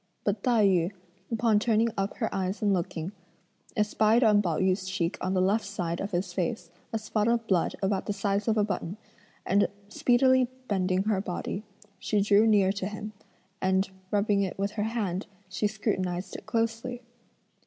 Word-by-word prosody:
But 205 Hz, 0 st, 0 dB
Tai 230 Hz, -3 st, +3 dB
yü, 180 Hz, -2 st, +3 dB, 0.4 s
upon 225 Hz, -2 st, +3 dB
turning 225 Hz, +1 st, +2 dB
up 195 Hz, +1 st, -2 dB
her 225 Hz, -, -2 dB
eyes 190 Hz, +2 st, -2 dB
and 205 Hz, -1 st, +3 dB
looking, 175 Hz, -1 st, -2 dB, 0.7 s
espied 215 Hz, +3 st, +3 dB
on 210 Hz, -2 st, +5 dB
Pao 170 Hz, -6 st, -1 dB
yü's 185 Hz, 0 st, +1 dB
cheek 180 Hz, -1 st, -1 dB
on 185 Hz, +1 st, -1 dB
the 185 Hz, -, +3 dB
left 205 Hz, +4 st, +2 dB
side 175 Hz, -4 st, -3 dB
of 200 Hz, -, -3 dB
his 180 Hz, -1 st, -2 dB
face, 175 Hz, -1 st, -2 dB, 0.2 s
a 225 Hz, -, 0 dB
spot 215 Hz, 0 st, -1 dB
of 235 Hz, -1 st, +2 dB
blood 185 Hz, -6 st, +1 dB
about 195 Hz, 0 st, 0 dB
the -, -, 0 dB
size 200 Hz, +1 st, -1 dB
of 220 Hz, -1 st, +2 dB
a 210 Hz, -, +4 dB
button, 190 Hz, -1 st, -3 dB, 0.5 s
and 200 Hz, +2 st, +3 dB, 0.2 s
speedily 255 Hz, +3 st, +4 dB, 0.2 s
bending 185 Hz, -1 st, +1 dB
her 205 Hz, -2 st, +1 dB
body, 195 Hz, +1 st, -4 dB, 0.4 s
she 210 Hz, -, 0 dB
drew 205 Hz, +2 st, +5 dB
near 200 Hz, -3 st, +4 dB
to 195 Hz, -1 st, -3 dB
him, 210 Hz, +1 st, -6 dB, 0.5 s
and 190 Hz, +1 st, +1 dB, 0.2 s
rubbing 205 Hz, 0 st, +2 dB
it 190 Hz, -2 st, -2 dB
with 200 Hz, +1 st, -1 dB
her 210 Hz, -, -3 dB
hand, 205 Hz, -5 st, -2 dB, 0.2 s
she 185 Hz, +3 st, 0 dB
scrutinised 185 Hz, -4 st, -2 dB
it -, -, -9 dB
closely. 230 Hz, +2 st, -1 dB
200 Hz, 175 wpm, -28 LUFS, 185-215 Hz, 0.7 s, on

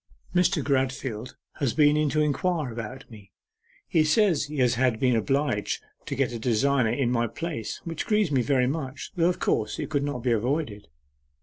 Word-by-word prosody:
'Mr. 180 Hz, -3 st, +2 dB
Gradfield 130 Hz, -4 st, -1 dB, 0.2 s
has 135 Hz, -5 st, -1 dB
been 150 Hz, -1 st, +5 dB
in 150 Hz, -1 st, +2 dB
to 155 Hz, +2 st, +1 dB
inquire 150 Hz, -1 st, 0 dB
about 115 Hz, +3 st, -7 dB
me. 105 Hz, -3 st, -14 dB, 0.6 s
He 160 Hz, -, +3 dB
says 165 Hz, -1 st, +3 dB
he 150 Hz, +1 st, -7 dB
has 125 Hz, -2 st, +3 dB, 0.2 s
been 125 Hz, +1 st, +2 dB
obliged 115 Hz, 0 st, 0 dB, 0.2 s
to -, -, -2 dB
get 135 Hz, -2 st, 0 dB
a 115 Hz, -, -4 dB
designer 125 Hz, +2 st, +2 dB
in 125 Hz, 0 st, 0 dB
my 120 Hz, -1 st, +1 dB
place, 150 Hz, -4 st, -5 dB
which 165 Hz, -2 st, -4 dB
grieves 210 Hz, -6 st, +2 dB
me 135 Hz, -3 st, +3 dB
very 125 Hz, +1 st, +2 dB
much, 135 Hz, -1 st, -4 dB
though, 170 Hz, -1 st, +3 dB
of 180 Hz, -, -1 dB
course, 105 Hz, -1 st, 0 dB
it -, -, -5 dB
could 145 Hz, -2 st, +1 dB
not 145 Hz, -4 st, -3 dB
be 125 Hz, -, +1 dB
avoided. 115 Hz, -2 st, -1 dB
135 Hz, 185 wpm, -26 LUFS, 120-155 Hz, 0.6 s, been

